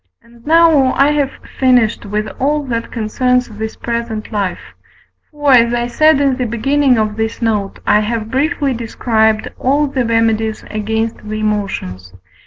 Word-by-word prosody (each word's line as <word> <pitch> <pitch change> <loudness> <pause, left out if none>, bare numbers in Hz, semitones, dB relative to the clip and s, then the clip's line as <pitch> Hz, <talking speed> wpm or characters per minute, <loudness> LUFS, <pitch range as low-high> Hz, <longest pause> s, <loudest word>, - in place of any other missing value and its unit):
And 235 0 -20
now 320 -5 +4
I 280 +2 +4
have 290 -2 +1 0.3
finished 245 -6 +2
with 210 +1 -2
all 295 +3 0
that 230 -3 -4
concerns 250 +3 0
this 220 0 -6
present 235 -2 -4
life: 200 -4 -4 0.6
for, 290 -2 0
as 235 -1 +4
I 240 0 -1
said 310 +4 +3
in 275 -2 +1
the 250 - -1
beginning 265 +3 +1
of 215 -1 -1
this 220 0 -2
note, 210 -4 -1
I 210 - +4
have 220 +1 -3
briefly 285 0 0
described 220 -2 0
all 285 +3 +2
the 270 -3 -1
remedies 225 -1 0
against 220 +1 -2
the 215 0 -6
emotions. 190 - -3
230 Hz, 155 wpm, -16 LUFS, 215-265 Hz, 0.6 s, now